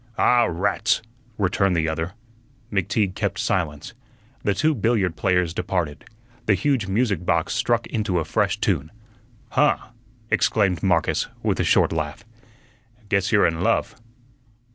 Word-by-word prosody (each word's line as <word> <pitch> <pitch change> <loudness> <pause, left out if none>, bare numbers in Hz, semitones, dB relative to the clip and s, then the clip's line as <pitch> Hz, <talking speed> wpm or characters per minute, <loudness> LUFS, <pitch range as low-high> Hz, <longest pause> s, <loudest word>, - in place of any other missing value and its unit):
"Ah, 120 -1 +4
rats!" 95 +6 0 0.3
returned 95 -1 +1
the 80 -1 +1
other. 80 +2 -3 0.6
McTeague 95 0 0
kept - - -2
silence. 75 -5 -2 0.5
The 100 - +1
two 155 +10 +2
billiard 110 - +1
players 90 +1 +1
departed. 85 -6 -2 0.4
The 105 - +5
huge 115 +1 0
music 100 -3 0
box 85 +1 +1
struck 115 0 +1
into 105 -5 -1
a 80 - 0
fresh - - 0
tune. 75 +3 0 0.6
"Huh!" - - +3 0.5
exclaimed 100 -5 +2
Marcus, 85 -4 +1 0.2
with - - 0
a - - +2
short - - +3
laugh, 75 -1 -4 0.8
"guess 100 -1 +1
you're 105 -2 +5
in 80 0 0
love." - - +1
95 Hz, 135 wpm, -23 LUFS, 85-105 Hz, 0.8 s, The